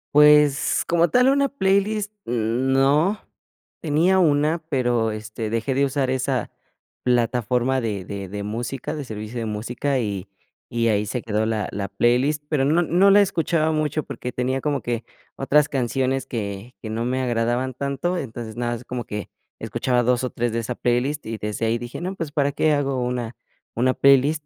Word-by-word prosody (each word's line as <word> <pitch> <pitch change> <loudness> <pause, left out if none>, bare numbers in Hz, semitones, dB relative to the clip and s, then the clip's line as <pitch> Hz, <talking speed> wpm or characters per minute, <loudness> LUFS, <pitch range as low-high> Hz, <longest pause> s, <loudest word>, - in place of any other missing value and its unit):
Pues, 150 -1 +5
como 170 0 +3
tal, 250 +10 +4
una 275 +1 +3
playlist 205 -3 +1 0.2
n 120 +3 0
no. 145 +10 +3 0.6
Tenía 165 +5 +3
una, 155 -1 +3
pero, 120 -5 +1
este, 110 +1 -5
dejé 115 +4 -1
de 135 +2 +2
usar 135 -1 0
esa 130 0 -1 0.5
plataforma 125 +1 +1
de 105 -5 -3
de 100 -1 -6
de 100 +1 -5
música, 120 +7 -4
de 150 - -4
servicio 110 +1 -6
de 115 - -3
música, 120 +6 -2
y 100 -4 -3 0.4
y 115 -1 0
ahí 105 -1 +2
se 110 +4 -3
quedó 110 -1 -1
la 110 -2 -1
la 100 -1 -3
playlist. 125 +8 +1
Pero 150 -3 +1
no 155 +5 +3
no 180 +4 +4
la 205 - +7
escuchaba 165 -4 +1
mucho 155 0 -1
porque 125 -2 -6
tenía 130 +2 -1
como 145 -1 0
que 120 +1 -3 0.3
otras 150 +2 +3
canciones 130 0 -1
que 105 0 -5
que 110 - -6
no 110 +1 -2
me 130 +2 -1
agradaban 120 +1 0
tanto. 140 +7 -2
Entonces, 115 -6 -6
nada 120 0 -1
es 120 +1 -10
como 125 -1 -4
que 105 -1 -6 0.3
escuchaba 125 -1 0
2, 125 +1 +1
o, 130 - -1
3 120 -1 -2
de 115 - 0
esa 115 +2 -4
playlist, 125 +6 0
y 115 0 -4
desde 105 +2 -2
ahí 115 +1 +1
dije: 120 +1 -7
"No, 185 +3 -4
pues, 165 -5 -5
¿para 145 -1 +1
qué 155 +2 +2
hago 140 -3 0
una 125 -1 -3 0.4
una 130 +2 +2
playlist? 140 +3 +4
125 Hz, 180 wpm, -23 LUFS, 115-150 Hz, 0.6 s, la